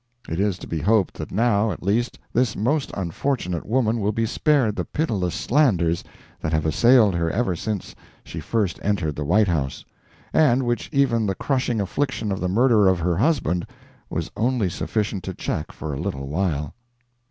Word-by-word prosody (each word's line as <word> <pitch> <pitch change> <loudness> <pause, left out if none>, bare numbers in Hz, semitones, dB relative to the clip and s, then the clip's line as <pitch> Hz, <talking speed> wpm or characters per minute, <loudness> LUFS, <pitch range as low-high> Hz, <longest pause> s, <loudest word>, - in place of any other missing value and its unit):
It 80 - -3
is 100 -2 +1
to - - -9
be 80 - -2
hoped 105 +1 +2
that - - -5
now, 110 0 +2
at - - -7
least, 110 +6 0 0.2
this 120 -2 +1
most 135 +8 0
unfortunate 90 - -2
woman 115 0 +1
will 105 0 +1
be 115 +1 0
spared 125 -2 +2
the - - -1
pitiless 105 - -1
slanders 95 - +2 0.4
that 80 - -3
have 80 -1 0
assailed 110 - +5
her 85 -1 0
ever 100 -1 0
since 105 +2 -4 0.3
she - - -7
first 105 -7 -1
entered 90 -8 0
the 75 - -3
White 100 +8 +3
House, 75 -7 -2 0.5
and 135 -4 +4
which 120 0 -1
even 125 -7 +2
the 95 - -1
crushing 130 -3 0
affliction 110 +1 -1
of 95 - -2
the 90 - -1
murder 110 0 +4
of 95 -1 +4
her 85 0 0
husband 100 - +1 0.4
was - - -3
only 115 -5 +1
sufficient 105 +1 -2
to 95 - -5
check 75 - -3
for 75 -2 -6
a 70 - -4
little 70 0 -4
while. 75 -2 -1
105 Hz, 180 wpm, -23 LUFS, 85-120 Hz, 0.5 s, assailed